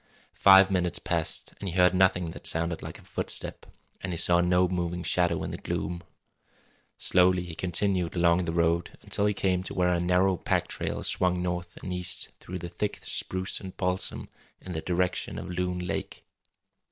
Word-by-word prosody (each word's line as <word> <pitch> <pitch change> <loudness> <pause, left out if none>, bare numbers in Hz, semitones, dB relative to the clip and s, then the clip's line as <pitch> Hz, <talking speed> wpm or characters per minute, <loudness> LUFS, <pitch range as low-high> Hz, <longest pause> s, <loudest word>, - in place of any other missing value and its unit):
Five 95 0 +7
minutes 90 -3 +1
passed 85 -2 -2
and 100 - -3
he 85 - -6
heard 90 -1 +5
nothing 90 -2 +3
that - - -5
sounded 80 0 -1
like 80 +4 -7
a 100 - -17
footstep, - - -4 0.3
and 95 - -3
he 85 - -3
saw 85 +1 +4
no 90 +1 +3
moving 90 -1 -2
shadow 85 -2 +1
in - - -4
the - - -5
gloom. 85 0 -3 1.0
Slowly 90 0 +3
he 85 -2 -7
continued 90 0 0
along 85 0 +3
the 80 - -1
road 85 0 +1
until 100 - +1
he 105 - 0
came 90 -2 +1
to 95 - -6
where 90 -1 +2
a 85 - +1
narrow 90 +2 +3
pack - - 0
trail - - -3
swung 90 -1 +1
north 90 -1 -3
and 90 - -3
east 90 -1 -4
through 90 - -6
the 85 0 -6
thick 105 +4 -3
spruce 95 +1 -2
and 95 -1 -9
balsam 90 0 -2 0.3
in 90 - -8
the 80 - -3
direction 90 +1 -1
of - - -6
Loon 90 0 -1
Lake. 90 0 -4
90 Hz, 185 wpm, -28 LUFS, 85-90 Hz, 1.0 s, Five